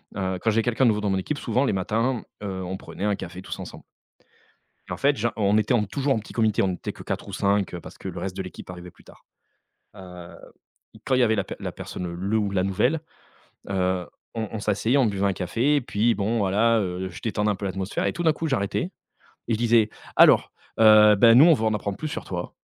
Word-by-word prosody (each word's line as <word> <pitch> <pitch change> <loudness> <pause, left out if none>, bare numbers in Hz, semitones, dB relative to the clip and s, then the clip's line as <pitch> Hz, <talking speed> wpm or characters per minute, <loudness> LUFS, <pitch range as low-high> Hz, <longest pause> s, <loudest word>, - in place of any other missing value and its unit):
heu, 95 -2 -2
quand 115 - +1
j'ai 115 +1 +2
quelqu'un 120 +2 +1
de - - +5
nouveau 105 -1 0
dans 105 - -1
mon 95 - +1
équipe, 145 +10 -3
souvent 130 - 0
les - - 0
matins, 115 +6 -1 0.2
heu, 95 -2 -4
on 90 +1 -4
prenait 95 - -9
un 105 -1 +1
café 90 0 -8
tous - - -7
ensemble - - -9 1.1
et - - -7
en - - -3
fait, 140 0 +2
gen 120 +3 0
on 105 -1 +2
était 110 +3 +1
en 115 -3 +3
toujours 135 +7 0
en 115 - -1
petit 105 - -12
comité, 110 -3 +2
on 95 -1 +1
était - - -6
que - - -11
4 - - -4
ou - - -8
5 100 -2 0
parce - - -12
que - - -8
le 90 -1 -5
reste 95 +1 -5
de - - -2
l'équipe 90 - -10
arrivait 90 0 -9
plus - - -22
tard, - - -19 0.7
heu 90 -2 -11 0.6
et - - -15
quand 130 - +1
il 130 - +3
y - - +5
avait 110 -2 +3
la 100 - -1
per - - -7
la - - -4
personne, 90 - -6
le 100 +5 -1
ou 105 -2 -1
la 95 -2 0
nouvelle, 125 - +1 0.7
heu, 95 -2 0 0.3
on 110 -2 -3
on 110 - -4
s'asseyait, 110 +5 +1
on 130 - +4
buvait 100 -1 0
un 100 - +2
café 115 +11 0
et 145 - +2
puis, 115 0 +1
bon, 110 +3 -1
voilà, 110 +3 +2
heu, 95 -1 -3
je 85 - -10
détendais 105 -2 0
un - - +1
peu 100 - -7
l'atmosphère 95 0 -2
et - - 0
tout 175 - -4
d'un 160 - +5
coup, 160 +2 -4
j'arrêtais 100 -9 -1 0.6
et 115 - 0
je - - +1
disais 115 -2 +3 0.3
«Alors, - - +6 0.3
heu, 110 -1 +7
beh, 115 +3 +6
nous, 140 +6 +8
on 170 - +7
veut 110 - -1
en 110 - +2
apprendre 100 -1 -3
plus 155 - -4
sur - - -5
toi» 90 -1 -5
105 Hz, 255 wpm, -24 LUFS, 95-115 Hz, 1.1 s, nous